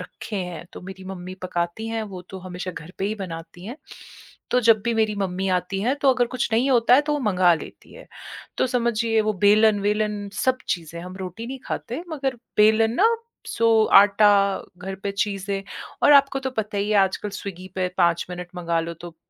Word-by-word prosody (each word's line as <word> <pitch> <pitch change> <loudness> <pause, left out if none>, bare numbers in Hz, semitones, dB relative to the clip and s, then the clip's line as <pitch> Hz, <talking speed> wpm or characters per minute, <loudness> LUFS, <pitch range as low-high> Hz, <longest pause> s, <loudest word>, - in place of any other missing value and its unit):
रखे 210 - -7
हैं, 180 -3 -5
तो - - -9
मेरी 190 +1 -10
मम्मी 185 -1 -7
पकाती 175 +4 -3
हैं, 225 0 -2
वो 195 -4 -7
तो 190 - -7
हमेशा 185 0 -6
घर 175 0 -10
पे - - -1
ही 210 +2 -1
बनाती 175 -3 -8
हैं। 240 +5 -7 0.8
तो 250 - +4
जब 225 -2 +5
भी 235 0 0
मेरी 220 -1 +1
मम्मी 190 0 -2
आती 195 +2 -5
हैं, 250 +5 +1
तो 280 -1 +3
अगर 245 -1 +2
कुछ 255 - 0
नहीं 245 +5 +2
होता 245 -1 +5
है 265 - +6
तो 295 0 -1
वो 295 - 0
मँगा 185 -6 +3
लेती 160 - -11
हैं, - - -13 0.5
तो - - +3
समझिए 235 -2 +1
वो 215 0 0
बेलन-वेलन 210 0 +3
सब 255 +5 +1
चीज़ें, 170 -1 -3
हम 185 +1 -9
रोटी 190 +4 -7
नहीं 265 +2 -6
खाते 255 +8 -4
मगर 270 -5 -2 0.2
बेलन 220 +1 +5
ना, 450 - +3 0.3
सो 225 -1 +3 0.2
आटा, 200 -1 +4 0.2
घर 190 +2 -6
पे 200 - -1
चीज़ें 200 -1 -2 0.4
और 295 - +7
आपको 275 -1 +5
तो 265 0 -3
पता 215 -4 -3
ही 205 +1 -1
है 210 - +3
आजकल 195 +1 +1
स्विगी 185 -1 -8
पे 185 -1 0
5 170 -2 +2
मिनट 180 0 -6
मँगा 170 -1 0
लो, 170 +1 -5
तो 170 0 -11
205 Hz, 200 wpm, -23 LUFS, 185-230 Hz, 0.8 s, और